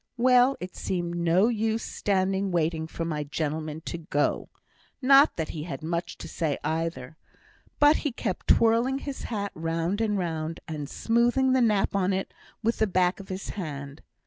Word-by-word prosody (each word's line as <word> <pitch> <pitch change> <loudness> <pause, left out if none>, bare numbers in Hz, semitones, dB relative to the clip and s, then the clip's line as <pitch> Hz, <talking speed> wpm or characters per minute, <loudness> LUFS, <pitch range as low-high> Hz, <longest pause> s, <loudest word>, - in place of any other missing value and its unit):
Well! 250 +2 +5
it 180 0 -7
seemed 175 -2 -2
no 175 +4 +3
use 225 -1 0
standing 195 0 0
waiting 160 -2 0
for 165 +1 -4
my 150 -2 -2
gentleman 155 +1 -3
to 170 0 -5
go; 145 -2 -1 0.5
not 275 +3 +6
that 160 -2 -3
he 155 - -5
had 165 0 -6
much 170 +2 -3
to - - -8
say 155 -5 -2
either; 155 -3 -3 0.6
but 295 +1 +6
he 295 - -2
kept 215 -6 -4
twirling 230 +4 +4
his 275 -1 -6
hat 205 -3 -3
round 165 +5 -2
and 210 -2 +1
round, 165 -2 -3
and 150 -3 -5
smoothing 240 +3 +2
the 260 - +3
nap 210 -4 +2
on't 190 0 0 0.3
with 230 +2 0
the 220 - +3
back 180 0 +1
of 195 - -11
his 190 +1 -5
hand. 145 -6 -6
185 Hz, 170 wpm, -27 LUFS, 160-225 Hz, 0.6 s, not